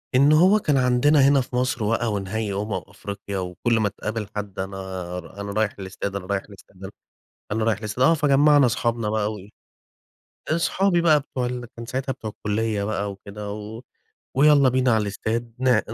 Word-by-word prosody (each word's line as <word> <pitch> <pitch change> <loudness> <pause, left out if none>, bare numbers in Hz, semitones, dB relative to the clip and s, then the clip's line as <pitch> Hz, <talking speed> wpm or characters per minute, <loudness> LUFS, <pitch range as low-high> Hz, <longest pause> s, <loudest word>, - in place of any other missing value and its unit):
إن 140 +3 +6
هو 185 +7 +5
كان 150 -7 +1
عندنا 130 +4 +3
هنا 140 -1 +4
في 125 - -7
مصر 125 -3 0
بقى 115 +1 0
ونهائي 100 +1 -3
أمم 105 +1 -3
أفريقيا، 100 0 -7
وكل 95 +6 -1
ما 105 -2 +1
تقابل 105 +1 -5
حد 100 -2 -5
أنا 95 +1 -4 0.4
ر 95 +4 -12
أنا 100 0 -5
رايح 110 0 0
الاستاد 95 +1 -5
أنا 95 -2 -4
رايح 100 0 -1
الاستاد 95 -1 -16
أنا 95 - -7 0.6
أنا 110 0 0
رايح 110 -3 +1
الاستاد، 110 +4 -1
آه 165 - +6
فجمّعنا 145 -2 +4
صحابنا 115 -2 -1
بقى 110 0 0
وإيه، 100 -1 -10 1.0
أصحابي 175 +2 +2
بقى 155 -3 +5
بتوع 130 -3 -4
ال 125 0 -4
كان 115 - -6
ساعتها 130 +2 -3
بتوع 110 -4 -7
الكلية 105 0 -2
بقى 100 -1 -2
وكده، 100 +1 -8
و 105 +2 -8 0.6
ويالّا 140 -1 +6
بينا 130 -1 +2
على 110 -1 +3
الاستاد 115 +3 -3
ن 125 -4 +4
110 Hz, 180 wpm, -23 LUFS, 100-130 Hz, 1.0 s, إن